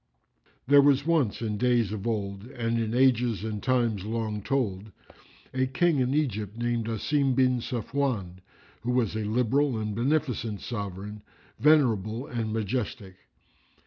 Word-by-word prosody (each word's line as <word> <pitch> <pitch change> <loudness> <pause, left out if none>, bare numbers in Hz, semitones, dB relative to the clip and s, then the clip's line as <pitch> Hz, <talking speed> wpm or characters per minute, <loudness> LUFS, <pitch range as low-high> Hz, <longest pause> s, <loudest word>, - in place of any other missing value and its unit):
There 140 +2 +7
was 140 0 +3
once, 150 -10 +1
in 105 -2 -2
days 120 -4 +2
of 105 +1 -4
old 100 -2 -3
and 115 -2 -2
in 115 0 -1
ages 125 -4 +3
and 110 -2 -4
times 120 -6 +1
long 110 -1 -3
told, 105 -5 -2 0.6
a 130 0 +1
King 150 +3 +2
in 130 +2 +1
Egypt 110 -7 -2
called 120 -1 -1
Asim 130 +4 +1
bin 125 -1 +3
Safwán,[FN#354] 115 -6 -2 0.4
who 120 +3 -2
was 115 -5 +1
a - - -1
liberal 125 +4 +1
and 105 -1 -3
beneficent 120 -5 -1
sovran, 105 -1 -5 0.4
venerable 120 -6 +3
and 115 -4 -3
majestic. 110 -2 -3
115 Hz, 140 wpm, -27 LUFS, 105-130 Hz, 0.6 s, There